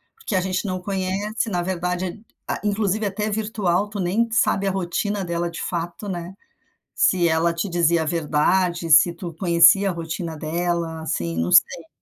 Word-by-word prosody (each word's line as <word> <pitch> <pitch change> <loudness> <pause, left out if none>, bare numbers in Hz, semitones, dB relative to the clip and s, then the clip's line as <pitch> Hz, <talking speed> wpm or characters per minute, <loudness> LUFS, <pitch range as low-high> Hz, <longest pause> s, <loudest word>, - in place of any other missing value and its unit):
porque 450 - -5
a 185 - +2
gente 190 +2 -2
não 185 0 -2
conhece. 200 +3 -2
Na 175 -3 -1
verdade, 180 +3 -3 0.2
ah, - - -2
inclusive 210 0 0
até 210 +2 -2
virtual. 205 -3 -1
Tu 205 -1 -6
nem 210 +6 0
sabe 200 -3 +2
a - - +1
rotina 195 +2 -2
dela 170 0 -2
de 165 - -7
fato, 175 +4 -4
né? 180 0 -5 0.6
Se 175 -2 +3
ela 165 +1 +1
te 170 +4 -3
dizia 170 -1 +2
a - - -5
verdade, 170 +2 0
se 160 +3 +6
tu 170 0 -7
conhecia 170 +3 +5
a 185 - -2
rotina 165 0 -5
dela. 165 +1 -2
Assim, 85 - -3
não 85 +2 -1
sei. - - +4
180 Hz, 175 wpm, -22 LUFS, 170-200 Hz, 0.6 s, se